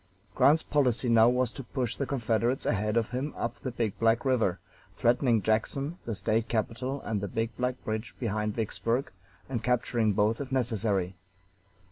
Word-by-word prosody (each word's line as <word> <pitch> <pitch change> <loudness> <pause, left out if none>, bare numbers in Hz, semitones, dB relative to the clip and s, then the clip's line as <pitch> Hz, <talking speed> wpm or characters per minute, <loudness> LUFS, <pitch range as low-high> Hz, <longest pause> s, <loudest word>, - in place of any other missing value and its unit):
Grant's 155 +8 +4
policy 125 -4 +1
now 115 0 +6
was 125 -1 +1
to - - -7
push 125 -1 -2
the 140 - -3
Confederates 120 -1 0
ahead 105 +1 +1
of 115 0 0
him 130 +4 -3
up 120 0 -3
the 130 - -4
Big 115 -4 -2
Black 115 +3 +3
River, 115 -9 +2 0.4
threatening 120 -2 +3
Jackson, 135 - 0
the 115 - -2
State 110 +3 0
capital, 120 +4 -2
and 105 -3 -2
the 100 - -2
Big 115 +3 -2
Black 125 0 -1
bridge 110 0 -3
behind 105 -2 -1
Vicksburg, 115 +3 -1 0.4
and 120 -4 -3
capturing 120 -3 +1
both 105 +5 +1
if 135 - -6
necessary. 110 -7 0
115 Hz, 165 wpm, -29 LUFS, 110-125 Hz, 0.4 s, now